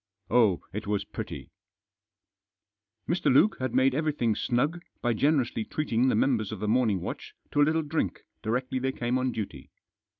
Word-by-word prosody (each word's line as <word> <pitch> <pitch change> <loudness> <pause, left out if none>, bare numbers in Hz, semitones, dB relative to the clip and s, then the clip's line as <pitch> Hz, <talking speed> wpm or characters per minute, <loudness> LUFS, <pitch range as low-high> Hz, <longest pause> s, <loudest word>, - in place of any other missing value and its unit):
Oh, 110 -6 +4
It 105 +1 -5
was 105 -1 0
pretty! - - -7 1.6
Mr. 175 -3 +2
Luke 170 +11 +5
had 130 -2 -2
made 130 0 +4
everything 145 -6 +1
snug 145 +8 0 0.2
by 120 -1 +1
generously 130 -3 +1
treating 130 -2 0
the - - +3
members 115 -6 +1
of 110 - -5
the 105 - -2
morning 110 -5 +2
watch - - -6 0.2
to 145 - +2
a - - +7
little 160 +1 +1
drink 155 +2 -2 0.2
directly 125 +4 -1
they 130 +1 -1
came 125 +1 -1
on 130 0 0
duty. 110 -4 -6
125 Hz, 165 wpm, -28 LUFS, 110-145 Hz, 1.6 s, a